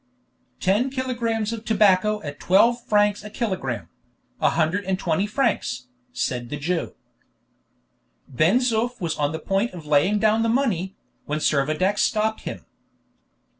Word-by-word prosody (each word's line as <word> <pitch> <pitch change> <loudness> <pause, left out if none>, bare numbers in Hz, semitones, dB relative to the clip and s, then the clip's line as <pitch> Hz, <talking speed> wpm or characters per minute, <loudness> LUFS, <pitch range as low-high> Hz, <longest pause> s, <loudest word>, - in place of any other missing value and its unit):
"Ten 210 +8 +2
kilogrammes 235 -4 -2
of 225 -1 -6
tobacco 210 -1 +3
at 145 -1 -7
twelve 235 +6 +3
francs 205 -1 +2
a 210 - -8
kilogramme: 135 - -3 0.5
a - - +4
hundred 170 +5 0
and 190 0 0
twenty 185 +2 0
francs," 205 - -1 0.2
said 120 -2 -3
the 150 - -4
Jew. 165 +4 -2 1.3
Ben 155 - +3
Zoof 245 -1 0
was 170 -3 -2
on 145 0 +1
the 160 - -3
point 195 +7 -1
of 165 -3 -9
laying 150 +8 +3
down 215 +1 +3
the 230 - +1
money, 215 -7 0 0.3
when 150 - -2
Servadac 155 +7 +1
stopped 220 0 +1
him. - - -7
200 Hz, 140 wpm, -23 LUFS, 160-225 Hz, 1.3 s, a